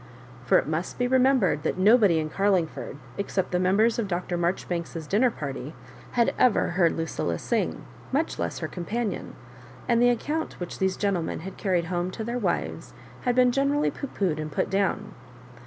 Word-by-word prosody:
For - - +5
it - - +1
must 160 +3 -3
be 245 - +1
remembered 255 - +3
that - - -1
nobody 205 -2 +5
in 155 -1 -2
Carlingford, 185 -7 0 0.2
except 195 -1 -1
the 180 - +1
members 210 +6 +3
of 220 - -1
Dr. 175 -1 -2
Maijoribanks's 170 -2 -2
dinner 215 +10 +3
party, 140 - -6 0.4
had 235 -1 +3
ever 250 - +4
heard 170 -1 +3
LuciUa 125 - -2
sing, - - -1 0.3
much - - 0
less 85 -1 -2
her 160 - -3
companion; 210 +7 -4 0.5
and 235 -1 +3
the 245 - +6
account 300 +7 -2
which 175 - -6
these 190 -1 +1
gentlemen 190 -7 -1
had 190 +3 -7
carried 180 -4 0
home 175 +1 -1
to 220 +4 -5
their 240 +2 -2
wives - - -2 0.3
had 245 -1 +2
been 250 -1 +5
generally 280 +3 +1
pooh 280 - -6
poohed 180 - -1
and 155 0 -4
put - - -1
down. 195 0 0
190 Hz, 175 wpm, -26 LUFS, 170-235 Hz, 0.5 s, the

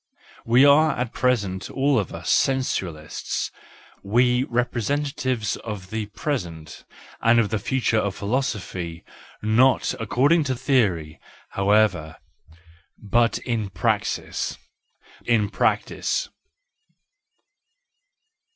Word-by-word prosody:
We 125 +4 +6
are 150 +1 +5
at 125 -1 -3
present 100 -8 0
all 135 -1 +2
of 100 - -4
us - - -3
sensualists, 95 - -1 0.5
we 125 +5 +2
representatives 125 -1 -1
of 100 -5 -7
the 110 -1 -3
present 90 - -5 0.4
and 115 +1 +5
of 110 -3 +1
the 110 - 0
future 115 -1 0
in 100 - 0
philosophy,— 100 -7 -3 0.4
not 120 +5 +3
according 140 +9 +2
to 130 -2 -1
theory, 100 - 0 0.3
however, 100 -5 +2 0.8
but 115 +3 +1
in 115 -5 -2
praxis, - - -2 0.7
in 110 -4 +2
practice. - - 0
115 Hz, 95 wpm, -23 LUFS, 100-130 Hz, 0.8 s, We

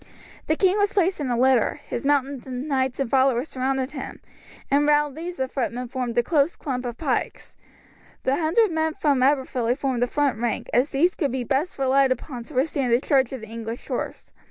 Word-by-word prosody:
The 315 - +2
king 380 +4 +2
was 410 0 +2
placed 375 -2 +2
in 280 -3 -2
a 240 - 0
litter, 255 -2 +3
his 255 - -3
mounted 275 -2 0
knights 260 0 -2
and 275 - 0
followers 260 +2 +2
surrounded 265 +1 -1
him, 275 - -7 0.5
and 290 +1 +3
round 295 -1 +3
these 345 +3 -6
the 265 - -1
footmen 250 -2 -3
formed 250 -2 -3
a 240 - +4
close 300 +3 +2
clump 255 -3 -4
of 240 -1 -6
pikes; 275 -6 -3 0.7
the 265 - +2
hundred 345 +7 +2
men 320 0 0
from 285 -4 +1
Aberfilly 260 -3 +1
formed 265 -4 -1
the 245 - +3
front 280 -3 0
rank, 240 -1 -2
as 250 +5 +3
these 330 +6 +2
could 285 -7 -1
be 255 -1 -2
best 280 +9 -1
relied 270 0 +3
upon 255 -2 -4
to 300 - -12
withstand 270 -2 0
the 235 - +5
charge 265 -2 +2
of 260 -3 -6
the 220 - -9
English 230 +1 -7
horse. - - -4
270 Hz, 205 wpm, -24 LUFS, 250-295 Hz, 0.7 s, the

